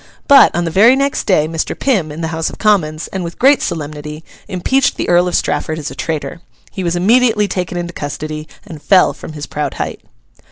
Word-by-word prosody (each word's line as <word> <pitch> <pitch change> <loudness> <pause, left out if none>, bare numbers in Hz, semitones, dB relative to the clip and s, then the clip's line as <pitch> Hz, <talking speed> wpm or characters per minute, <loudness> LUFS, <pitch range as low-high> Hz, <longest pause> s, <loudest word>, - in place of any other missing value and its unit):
But, 280 -2 +8
on 175 - 0
the 165 - -2
very 220 +9 +6
next 275 +1 -1
day 155 -7 +3
Mr. 165 0 -3
Pym, 195 - 0
in 155 +3 -7
the 160 - -2
House 160 0 -2
of - - -11
Commons, 170 -7 +1
and 190 -2 -4
with 170 0 -7
great 275 +2 +4
solemnity, 150 -1 -5 0.2
impeached 215 +8 0
the - - -2
Earl 175 +1 +3
of 175 - -1
Strafford 155 -1 -1
as 150 -2 -5
a - - -7
traitor. 155 0 -4 0.3
He 190 - -5
was 170 0 -1
immediately 220 +3 +3
taken 180 -2 -3
into 175 0 -4
custody 155 +1 -6 0.2
and 160 -7 -10
fell 180 +6 +4
from 160 - -10
his 150 -1 -6
proud 150 0 -4
height. - - -4
170 Hz, 210 wpm, -16 LUFS, 155-200 Hz, 0.3 s, But